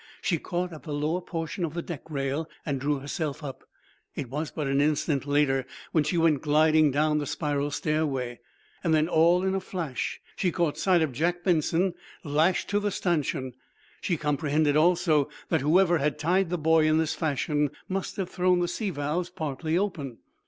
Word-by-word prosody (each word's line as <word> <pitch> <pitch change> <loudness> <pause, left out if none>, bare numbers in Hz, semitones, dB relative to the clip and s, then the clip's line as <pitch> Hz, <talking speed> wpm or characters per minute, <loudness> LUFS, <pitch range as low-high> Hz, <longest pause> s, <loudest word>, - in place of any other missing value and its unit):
She 170 -4 0
caught 175 +1 -3
at 155 - -9
the 150 -3 -5
lower 155 +5 -1
portion 165 0 -4
of 165 -1 -3
the 170 - -2
deck 170 -6 -6
rail 140 +2 -2 0.2
and 140 -4 -2
drew 145 +1 +1
herself 145 +2 -4
up. 135 -2 -7 0.5
It 130 -4 -5
was 150 +3 -2
but 150 - -4
an 135 +1 +2
instant 145 -1 +1
later 145 -2 +2 0.3
when 155 - +3
she 155 +4 -1
went 165 -4 +3
gliding 155 0 +4
down 150 +2 +2
the 145 - -3
spiral 145 -1 -1
stairway. 145 -5 -1 0.4
Then, 160 -2 +3
all 170 +2 +4
in 190 0 +1
a 195 - +1
flash, 170 -8 -4 0.2
she 180 - 0
caught 170 -3 0
sight 180 -4 +3
of 155 - -1
Jack 175 +7 -1
Benson, 175 +1 +2 0.3
lashed 155 +4 +2
to 205 - +2
the 205 0 0
stanchion. 155 -8 -1 0.5
She 175 - 0
comprehended, 150 0 +1
also, 160 -3 +3 0.2
that 160 -4 +2
whoever 175 +3 +4
had 150 +1 0
tied 175 +4 +1
the 180 - -1
boy 160 0 +4
in 155 0 +3
this 160 -1 +1
fashion 150 -1 0 0.2
must 195 +3 -3
have 185 -2 -3
thrown 180 0 +2
the 175 - +1
sea 200 +4 -2
valves 160 +2 -2
partly 155 0 -2
open. 150 - -2
155 Hz, 185 wpm, -27 LUFS, 145-175 Hz, 0.5 s, gliding